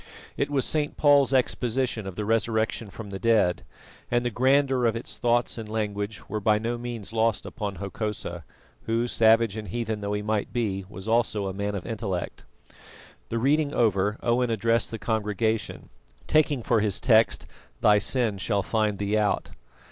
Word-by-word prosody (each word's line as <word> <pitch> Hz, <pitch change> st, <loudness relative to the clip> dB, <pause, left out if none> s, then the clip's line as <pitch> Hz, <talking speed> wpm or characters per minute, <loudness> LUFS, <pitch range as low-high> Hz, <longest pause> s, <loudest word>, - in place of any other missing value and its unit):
It -, -, -1 dB
was 140 Hz, -3 st, +1 dB
St. 150 Hz, -2 st, -1 dB
Paul's 145 Hz, -2 st, +5 dB
exposition 125 Hz, -3 st, 0 dB
of 95 Hz, -, -6 dB
the 105 Hz, -, -3 dB
resurrection 110 Hz, 0 st, 0 dB
from 105 Hz, 0 st, -9 dB
the 95 Hz, -, -5 dB
dead, 105 Hz, -6 st, +2 dB, 0.5 s
and 120 Hz, 0 st, +1 dB
the 120 Hz, -, 0 dB
grandeur 130 Hz, +1 st, +3 dB
of 115 Hz, -, 0 dB
its 115 Hz, -, -6 dB
thoughts 120 Hz, 0 st, +1 dB
and 110 Hz, -1 st, -7 dB
language 105 Hz, -1 st, -3 dB
were 110 Hz, -, -3 dB
by 105 Hz, +1 st, +3 dB
no 115 Hz, +2 st, -2 dB
means 120 Hz, -3 st, -6 dB
lost 115 Hz, 0 st, +1 dB
upon 105 Hz, -5 st, -5 dB
Hokosa, 95 Hz, -2 st, -5 dB, 0.4 s
who, 115 Hz, +1 st, +1 dB
savage 115 Hz, -2 st, +4 dB
and 105 Hz, -1 st, -6 dB
heathen 110 Hz, +1 st, -3 dB
though 100 Hz, 0 st, -2 dB
he 105 Hz, 0 st, -2 dB
might 105 Hz, -1 st, -1 dB
be, 100 Hz, -5 st, -2 dB
was 95 Hz, +1 st, -9 dB
also 110 Hz, -3 st, +1 dB
a 95 Hz, -, -3 dB
man 100 Hz, +1 st, -3 dB
of 95 Hz, -, -5 dB
intellect. 100 Hz, -6 st, -4 dB, 0.8 s
The 115 Hz, -, -2 dB
reading 145 Hz, +4 st, +1 dB
over, 105 Hz, -1 st, +2 dB
Owen 120 Hz, +1 st, +2 dB
addressed 115 Hz, +1 st, +1 dB
the 115 Hz, -, -5 dB
congregation, 110 Hz, 0 st, -2 dB, 0.4 s
taking 150 Hz, -5 st, +2 dB
for 115 Hz, -1 st, +2 dB
his 105 Hz, -2 st, 0 dB
text, 115 Hz, -3 st, +3 dB, 0.4 s
"Thy 105 Hz, -1 st, +5 dB
sin 115 Hz, -4 st, 0 dB
shall 100 Hz, 0 st, 0 dB
find 110 Hz, -2 st, 0 dB
thee 100 Hz, +1 st, -1 dB
out." 105 Hz, -1 st, 0 dB
110 Hz, 170 wpm, -26 LUFS, 105-120 Hz, 0.8 s, Paul's